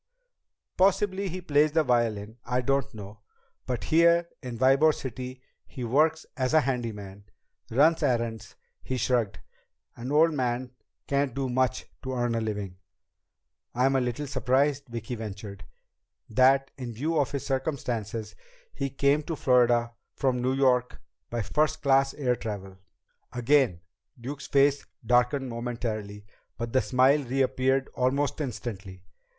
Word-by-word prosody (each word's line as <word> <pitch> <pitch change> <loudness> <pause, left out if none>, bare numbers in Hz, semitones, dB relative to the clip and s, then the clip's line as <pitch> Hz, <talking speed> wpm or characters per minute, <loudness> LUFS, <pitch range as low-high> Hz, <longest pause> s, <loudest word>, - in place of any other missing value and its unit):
"Possibly 195 +1 +2
he 185 +2 -5
plays 150 -2 +2
the 160 -1 +3
violin. 115 -3 0
I 125 +1 0
don't 135 +1 0
know. 105 0 -10 0.5
But 125 -2 -2
here 170 +1 +4
in 125 -4 -6
Ybor 135 +5 +4
City 130 0 -7 0.2
he 125 - -7
works 155 +6 +2
as 130 +2 0
a 155 - +7
handyman. 105 -7 -4 0.4
Runs 155 +8 +4
errands." 115 -6 -1 0.3
He 130 - -3
shrugged. 120 -3 0 0.6
"An 125 +3 -6
old 160 +2 +4
man 125 -2 -2 0.3
can't 140 -2 0
do 135 -1 -2
much 130 +1 0 0.2
to 130 -1 -4
earn 120 -1 0
a 115 - 0
living." 105 -4 -4 1.0
"I'm 130 +2 +3
a 135 - +3
little 125 +4 -2
surprised," 135 +2 +1
Vicki 120 +1 -6
ventured, 100 -3 -7 0.7
"that, 135 +4 +4
in 120 -2 -5
view 155 +8 -1
of 140 - +1
his 140 -2 -4
circumstances, 120 -6 -3 0.4
he 140 - -3
came 140 +2 +2
to 160 +2 -4
Florida 120 -3 +3 0.2
from 130 -3 0
New 130 +1 +1
York 125 -2 +2 0.3
by 120 -2 -2
first 155 +7 0
class 135 0 +3
air 125 -4 +1
travel." 95 -5 -7 0.5
Again 120 - +2 0.4
Duke's 140 +4 -7
face 140 0 +3 0.2
darkened 125 +3 +2
momentarily, 115 -4 -4 0.3
but 115 -1 -5
the 130 - +4
smile 130 +3 +3
reappeared 130 +1 +1
almost 140 +4 0
instantly. 100 -8 -6
130 Hz, 135 wpm, -27 LUFS, 115-140 Hz, 1.0 s, a